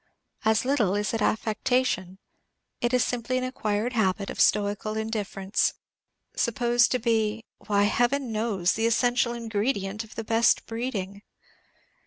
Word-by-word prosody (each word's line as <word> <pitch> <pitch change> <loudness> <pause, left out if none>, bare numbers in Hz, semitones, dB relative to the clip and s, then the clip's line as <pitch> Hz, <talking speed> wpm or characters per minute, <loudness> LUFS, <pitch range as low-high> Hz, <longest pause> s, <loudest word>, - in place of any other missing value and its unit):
As 220 +2 +2
little 235 -8 +2
is 210 +2 -1
it 225 - -1
affectation; 215 -3 0 0.6
it 240 -1 0
is 250 -2 +3
simply 245 +1 -2
an 255 - -1
acquired 230 -2 -2
habit 200 -3 0
of - - -2
stoical 210 +1 +1
indifference, 210 -3 -1 0.6
supposed 240 0 +2
to - - +3
be 225 -2 0 0.2
why, 205 -1 +3
Heaven 245 +4 +1
knows! 215 -5 0
the 225 +1 +1
essential 245 +1 +2
ingredient 215 -2 -2
of 220 - -15
the 225 - -4
best 225 +2 +3
breeding. 210 -4 -4
225 Hz, 135 wpm, -26 LUFS, 205-240 Hz, 0.6 s, is